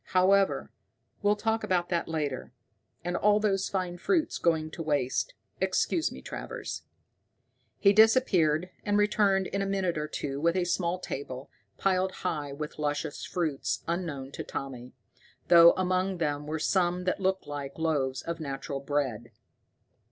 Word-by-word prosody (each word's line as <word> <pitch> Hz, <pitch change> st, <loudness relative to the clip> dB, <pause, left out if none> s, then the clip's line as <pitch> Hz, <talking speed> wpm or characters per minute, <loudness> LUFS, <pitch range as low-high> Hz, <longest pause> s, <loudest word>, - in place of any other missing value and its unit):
However, 195 Hz, +1 st, +3 dB, 0.5 s
we'll 205 Hz, 0 st, +3 dB
talk 225 Hz, +1 st, -1 dB
about 175 Hz, -2 st, 0 dB
that 170 Hz, -1 st, 0 dB
later. 150 Hz, -7 st, -3 dB, 0.5 s
And 175 Hz, +1 st, -2 dB
all 210 Hz, 0 st, +4 dB
those 195 Hz, -3 st, +1 dB
fine 180 Hz, -2 st, -2 dB
fruits 325 Hz, -, +1 dB
going 160 Hz, -2 st, +1 dB
to 165 Hz, -, -6 dB
waste! 150 Hz, -, 0 dB, 0.2 s
Excuse 330 Hz, 0 st, +1 dB
me, -, -, -10 dB
Travers." -, -, -6 dB, 0.9 s
He 200 Hz, 0 st, +5 dB
disappeared, 185 Hz, -7 st, +4 dB
and 205 Hz, 0 st, +1 dB
returned 205 Hz, -2 st, +3 dB
in 195 Hz, +2 st, -2 dB
a 195 Hz, -, -1 dB
minute 190 Hz, -5 st, 0 dB
or 150 Hz, -, -2 dB
two 140 Hz, -2 st, -4 dB
with 170 Hz, +2 st, +2 dB
a 185 Hz, -, +2 dB
small 175 Hz, 0 st, 0 dB
table, 135 Hz, -6 st, -6 dB, 0.3 s
piled 190 Hz, -1 st, +1 dB
high 150 Hz, -5 st, -1 dB
with 150 Hz, +2 st, -6 dB
luscious 150 Hz, 0 st, -2 dB
fruits 160 Hz, -6 st, -2 dB
unknown 165 Hz, -6 st, -3 dB
to -, -, -5 dB
Tommy, 125 Hz, -2 st, -6 dB, 0.6 s
though 170 Hz, -1 st, +9 dB
among 185 Hz, 0 st, 0 dB
them 150 Hz, -3 st, -2 dB
were 155 Hz, +1 st, -2 dB
some 180 Hz, +2 st, +1 dB
that 185 Hz, -, 0 dB
looked 190 Hz, 0 st, 0 dB
like 140 Hz, -1 st, -6 dB
loaves 140 Hz, -6 st, 0 dB
of 170 Hz, 0 st, -4 dB
natural 140 Hz, -2 st, -4 dB
bread. 135 Hz, -5 st, -2 dB
170 Hz, 150 wpm, -29 LUFS, 145-190 Hz, 0.9 s, though